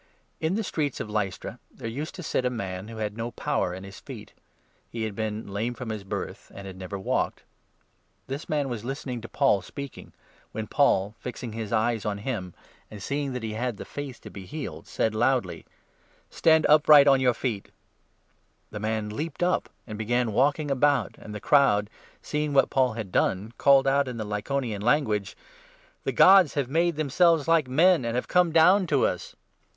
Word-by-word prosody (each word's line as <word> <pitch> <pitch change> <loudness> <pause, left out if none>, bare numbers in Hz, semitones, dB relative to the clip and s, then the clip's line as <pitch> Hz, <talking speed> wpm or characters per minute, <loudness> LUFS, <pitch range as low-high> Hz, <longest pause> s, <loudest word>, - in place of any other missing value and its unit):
In 160 +4 0
the 220 - -1
streets 150 - -2
of 105 - -5
Lystra 100 -3 -3
there - - -8
used 140 +8 -5
to 180 - -7
sit 130 - -1
a - - +2
8 - - +1
and 125 - -5
Barnabas 95 -4 -3
man 95 +3 -7
who 115 0 -9
had 105 -1 -3
no 115 +1 -3
power 100 -5 -1
in 95 +2 -7
his 100 0 -10
feet; - - -10 0.6
he 115 -1 -4
had 110 -2 -3
been 110 0 -3
at - - -12
Lystra. 100 - -10
lame 115 +4 -2
from 125 -1 -7
his 105 -2 -5
birth, 95 - -6
and 100 - -9
had 95 -1 -8
never 95 +1 -6
walked. 95 - -2 0.8
This 140 +4 -6
9 155 - 0
man 140 -2 -1
was 115 -3 -5
listening 125 -1 -5
to 115 - -9
Paul 135 -9 +2
speaking, 140 +8 -9 0.4
when 110 0 -3
Paul, 105 -7 +2
fixing 125 -1 -6
his 110 -2 -5
eyes 110 0 +1
on 105 -1 -2
him, 100 -6 -5 0.3
and 105 - -9
seeing 140 +5 -3
that 125 -2 -5
he 110 -1 -3
had 120 0 -3
the - - -8
faith 140 -3 -7
to - - -11
be 95 -2 -10
healed, 115 - -7
said 110 - -1
loudly: 120 +3 0 0.3
" - - -35
Stand 160 -1 +4
upright 150 -1 +7
on 135 -1 +5
your 125 -2 +3
feet." 110 -5 -3
10 - - -24 1.0
The 105 - -6
man 110 0 -2
leaped 155 +8 -4
up, 180 +1 +1 0.2
and 110 -2 -7
began 120 0 0
walking 145 +4 +1
about, 140 -4 +2
and 105 - -10
the 105 - -5
n - - -12
crowd, 105 -8 +3 0.3
seeing 150 -1 -2
what 135 - +4
Paul 130 -3 +2
had 110 -4 -6
done, 100 +6 0
called 140 -1 +5
out 140 0 +2
in 125 -2 -5
the 110 - -4
Lycaonian 105 +1 -3
language: 110 -5 +1 0.7
"The - - 0
Gods 190 -5 +6
have 140 -4 -1
made 170 +2 +2
themselves 155 +1 +2
like 165 -4 +3
men 165 +4 +4
and 115 0 -2
have 125 - -2
come 180 -2 +3
down 180 +4 +5
to 145 -4 +2
us." - - -3
125 Hz, 210 wpm, -26 LUFS, 105-145 Hz, 1.0 s, upright